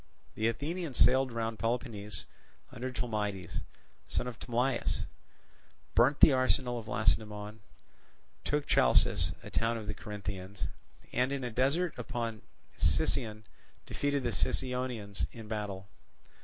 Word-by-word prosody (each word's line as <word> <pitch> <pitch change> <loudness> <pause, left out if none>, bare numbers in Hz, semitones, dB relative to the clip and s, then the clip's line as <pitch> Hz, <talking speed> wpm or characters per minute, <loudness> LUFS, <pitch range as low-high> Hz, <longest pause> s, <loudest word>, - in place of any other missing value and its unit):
The 110 - +1
Athenians 150 +4 -2
sailed 130 0 +5
round 115 -1 -2
Peloponnese 115 -3 -2 0.5
under 130 +1 -4
Tolmides, 105 -7 -2 0.5
son - - -1
of 125 -2 -6
Tolmaeus, 125 +1 0 0.9
burnt 130 +5 +4
the 150 - +9
arsenal 130 -1 +2
of 110 - -10
Lacedaemon, 105 0 0 0.8
took 145 0 0
Chalcis, - - +4
a - - -9
town 115 +1 +1
of 110 - -6
the 105 - -2
Corinthians, 100 -2 -5 0.5
and 125 +2 +2
in 140 -1 -2
a 120 - -2
descent 140 +9 +2
upon 115 -2 -3 0.4
Sicyon 110 -2 +1 0.4
defeated 145 -1 0
the 120 - 0
Sicyonians 115 - -1
in 110 -2 -9
battle. 105 -3 -4
115 Hz, 120 wpm, -32 LUFS, 105-130 Hz, 0.9 s, the